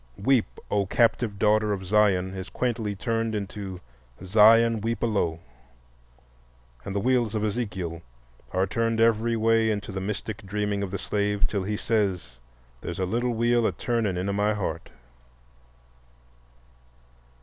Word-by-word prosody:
"Weep, 125 +2 +1
O 100 -2 +1
captive 115 -1 +1
daughter 105 +1 +3
of 95 -1 -5
Zion," 95 -2 +2
is 95 0 -6
quaintly 115 -4 -2
turned 115 +2 -1
into 100 -2 -5 0.5
"Zion, 110 +3 +5
weep 115 +2 -2
a - - +4
low," 85 -7 -1 1.4
and 100 - -6
the - - +1
wheels 120 -1 +1
of 105 - -1
Ezekiel 100 -7 -3 0.5
are 95 +1 +1
turned 115 +3 -1
every 115 0 +3
way 115 0 +3
in 105 -1 0
the 95 -2 -4
mystic 105 +1 -4
dreaming 105 0 -2
of 100 - -2
the 100 - -3
slave, 105 0 0
till 100 - -1
he 105 +1 -2
says: 95 - -1 0.4
"There's 85 - -5
a 95 - 0
little 120 +5 -1
wheel 120 0 +2
a - - 0
turnin' 115 -6 -1
in 90 +2 -2
a 100 - 0
my 105 +1 +1
heart." 85 -5 -4
105 Hz, 150 wpm, -26 LUFS, 95-115 Hz, 1.4 s, Zion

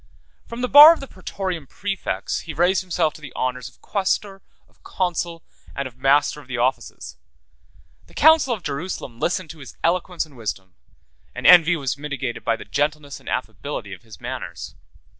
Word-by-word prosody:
From 235 +1 -7
the 250 - 0
bar 295 +5 +10
of - - -7
the 275 - -7
Praetorian 185 - -5
præfects, 195 +4 -3
he 160 - -7
raised 180 +4 +2
himself 170 -4 0
to - - -14
the 140 -3 -9
honors 125 -1 -3
of - - -26
quaestor, 195 0 -1 0.3
of - - -33
consul, 170 -2 -3 0.3
and 140 - -3
of 125 - -14
master 140 +3 +2
of 135 - -19
the 130 -2 -4
offices: 120 - -2 0.9
the - - -20
council 315 -3 +5
of 215 -7 -3
Justinian 140 -5 -5
listened 175 -2 -1
to 165 - -13
his 135 - -12
eloquence 175 0 0
and 150 -3 -19
wisdom; 100 -5 -6 0.6
and - - -7
envy 175 -1 +8
was 140 -3 -3
mitigated 135 -5 -4
by 115 - +1
the 115 - -10
gentleness 145 +6 -2
and - - -10
affability - - -4
of - - -11
his - - -14
manners. - - -7
160 Hz, 180 wpm, -22 LUFS, 135-185 Hz, 0.9 s, bar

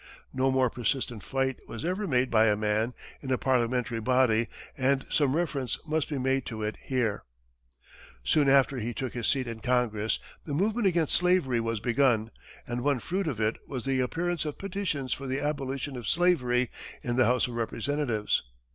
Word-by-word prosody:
No 130 +1 +2
more 130 -2 +2
persistent 120 -1 -2
fight 135 +2 -1
was 115 +6 -6
ever 190 +4 -1
made 125 -2 +2
by 110 -1 +5
a 105 - +4
man 110 +3 0 0.3
in 130 - -4
a 130 - +3
parliamentary 125 -2 +1
body 115 -1 +3 0.3
and 135 0 +1
some 145 -2 +3
reference 140 -8 -1
must 155 -1 0
be 145 - -2
made 130 0 +1
to 110 -2 -4
it 105 +1 -2
here. 120 -6 -1 1.0
Soon 145 - +3
after 135 -1 +4
he 115 +1 -3
took 130 -3 -3
his 120 -2 -2
seat 135 -2 +2
in 115 -1 -5
Congress, 110 -3 +1 0.3
the 145 - -4
movement 210 +5 +2
against 170 -4 +1
slavery 180 -9 +3
was 115 -1 -1
begun, 120 -1 +2 0.3
and 120 0 -3
one 140 -1 +2
fruit 185 +8 -2
of 130 -8 -2
it 110 0 +1
was 130 -4 -5
the 135 -1 +1
appearance 170 +6 0
of 150 -2 -4
petitions 180 -10 -2
for 135 - -6
the 130 +2 -1
abolition 140 -2 -2
of 120 -4 -6
slavery 125 - +2 0.3
in 120 -1 -1
the 130 0 +4
House 125 +1 +2
of 120 - -7
Representatives. 120 -1 0
130 Hz, 180 wpm, -28 LUFS, 120-145 Hz, 1.0 s, by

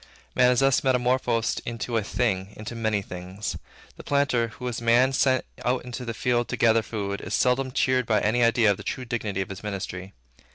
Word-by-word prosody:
Man 125 -1 +5
is 125 +1 +3
thus 135 -1 +3
metamorphosed 125 -3 +1
into 115 0 -4
a 115 - +3
thing, 100 -3 -1
into 110 +2 -6
many 110 -3 -1
things. 90 +3 -6 0.4
The - - -10
planter, 140 -5 +1
who 125 +3 -8
is 120 -1 -3
Man 120 +3 +4
sent 130 -1 +2 0.2
out 125 0 0
into 125 0 -6
the 115 -1 -4
field 120 0 +1
to - - -3
gather 115 -1 +4
food, 100 -1 -4
is - - -3
seldom 130 +1 +1
cheered 125 -1 +1
by 110 - +3
any 120 +4 +2
idea 115 -2 +4
of 100 - -1
the - - -9
true 130 - -4
dignity 110 -5 -2
of 95 - -4
his 100 0 -7
ministry. 95 -2 -5
115 Hz, 205 wpm, -25 LUFS, 105-125 Hz, 0.4 s, Man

